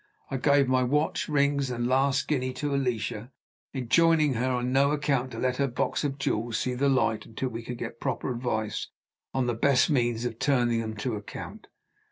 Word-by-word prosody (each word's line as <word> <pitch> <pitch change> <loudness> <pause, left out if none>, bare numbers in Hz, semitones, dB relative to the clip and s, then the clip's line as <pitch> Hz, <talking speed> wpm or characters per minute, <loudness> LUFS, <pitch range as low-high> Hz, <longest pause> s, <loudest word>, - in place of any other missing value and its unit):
I 135 - 0
gave 140 +1 +3
my 130 0 +3
watch, 150 +6 0
rings, 140 -2 +2
and 120 -1 -2
last 135 +2 +2
guinea 130 -4 0
to 145 +2 -2
Alicia, 125 -3 -2 0.4
enjoining 155 +3 +3
her, 125 +2 0
on 125 0 -1
no 140 +1 +4
account, 145 -3 0
to - - -8
let 125 0 0
her 140 - +2
box 125 +4 -1
of 140 -2 -2
jewels 115 -4 -1
see 125 - -1
the 140 +3 +1
light 120 -5 +1
until 125 +4 -3
we 115 -1 -6
could 120 +1 -6
get 115 0 -6
proper 130 -1 -2
advice 110 -3 -2 0.4
on 130 -1 0
the 120 - 0
best 125 +4 +3
means 120 -3 +1
of 115 -2 -4
turning 120 -5 +2
them 110 -1 -5
to 110 +3 -3
account. 105 - -9
130 Hz, 195 wpm, -27 LUFS, 120-140 Hz, 0.4 s, no